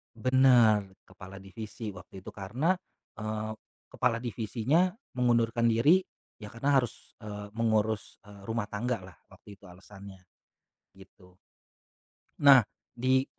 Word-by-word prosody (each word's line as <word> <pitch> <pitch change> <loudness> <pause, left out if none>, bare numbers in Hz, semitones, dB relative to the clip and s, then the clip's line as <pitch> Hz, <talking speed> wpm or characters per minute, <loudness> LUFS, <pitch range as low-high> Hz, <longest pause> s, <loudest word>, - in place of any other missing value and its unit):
Bener 120 -5 +4 0.2
kepala 95 0 -12
divisi 110 +3 -8
waktu 90 +1 -11
itu 100 +4 -10
karena, 125 - 0 0.4
eee, 110 0 -4 0.4
kepala 120 -2 0
divisinya 120 - 0 0.2
mengundurkan 115 -1 +2
diri, 150 +12 +4 0.4
ya 105 -2 -9
karena 140 +5 0
harus, 120 -3 -7
eee, 105 -1 -7
mengurus, 110 -1 -1
eee, 100 -1 -14
rumah 115 0 -3
tanggalah 105 -4 -4 0.2
waktu 100 - -14
itu 100 - -34
alasannya, 95 +1 -13 0.7
gitu. 90 -1 -19 1.0
Nah 140 -3 +8 0.3
di 130 +2 +2
110 Hz, 110 wpm, -29 LUFS, 100-125 Hz, 1.0 s, Nah